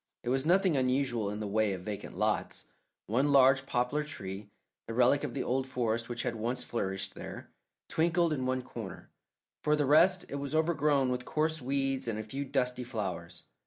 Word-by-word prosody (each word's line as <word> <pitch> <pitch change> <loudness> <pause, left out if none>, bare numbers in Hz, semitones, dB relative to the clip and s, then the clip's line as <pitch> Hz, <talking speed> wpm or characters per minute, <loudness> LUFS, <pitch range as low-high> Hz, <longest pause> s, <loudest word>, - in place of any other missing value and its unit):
It - - -3
was 135 +3 +1
nothing 185 -1 +4
unusual 130 -4 +1
in 105 +1 -4
the 105 - -3
way 105 0 +1
of 90 -1 -6
vacant 105 0 -6
lots. - - -1 0.4
One 130 +7 +1
large 135 0 +5
poplar 125 +4 0
tree, 100 -8 -7 0.4
the 115 - -5
relic 125 +4 +4
of 140 -4 -4
the 135 - -1
old 130 +1 0
forest 115 -2 -1
which 120 0 -3
had 120 - -2
once 120 +3 -2
flourished 95 -4 -3
there, - - -9 0.4
twinkled 170 0 +2
in 130 -3 -2
one 130 0 0
corner; 110 -7 -8 0.5
for 150 0 +3
the 150 -1 +1
rest, 170 +6 +5
it 140 - -5
was 140 +2 -4
overgrown 150 -4 +2
with 125 0 -2
coarse 160 0 0
weeds 135 0 0
and 110 -2 -1
a 110 - -3
few 135 +6 -4
dusty 125 -2 0
flowers. 95 -7 -5
130 Hz, 190 wpm, -31 LUFS, 115-145 Hz, 0.5 s, large